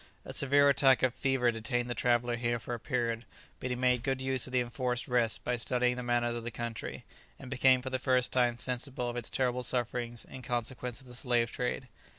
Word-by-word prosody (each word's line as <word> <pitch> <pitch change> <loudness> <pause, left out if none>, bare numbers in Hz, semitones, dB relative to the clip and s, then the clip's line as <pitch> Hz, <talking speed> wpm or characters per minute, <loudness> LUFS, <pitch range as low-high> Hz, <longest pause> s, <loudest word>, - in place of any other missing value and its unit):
A - - -7
severe 140 +1 +4
attack 135 -2 +5
of 130 -2 +3
fever 130 -3 +2
detained 120 +2 -2
the 120 - -2
traveller 120 0 +1
here 120 0 0
for 120 +1 -6
a 120 - -3
period, 120 -2 -1 0.4
but 130 - -3
he 125 - 0
made 125 -1 +2
good 135 0 -1
use 130 -1 0
of - - -9
the 130 - +2
enforced 125 0 -2
rest 120 -3 +1
by 125 0 0
studying 125 +1 +1
the 125 - -4
manners 120 -1 +1
of 120 -1 -4
the 120 - -3
country, 115 -1 -5 0.3
and 130 -1 -10
became 130 -1 +4
for 130 - -4
the 130 - -1
first 130 -1 +2
time 120 -2 +2
sensible 125 0 -2
of 120 - -3
its 120 -2 -2
terrible 125 -1 0
sufferings 120 -1 -1
in 130 - -10
consequence 125 0 -3
of - - -17
the 125 - -12
slave 120 -2 +1
trade. 125 +1 -2
125 Hz, 220 wpm, -31 LUFS, 120-130 Hz, 0.4 s, attack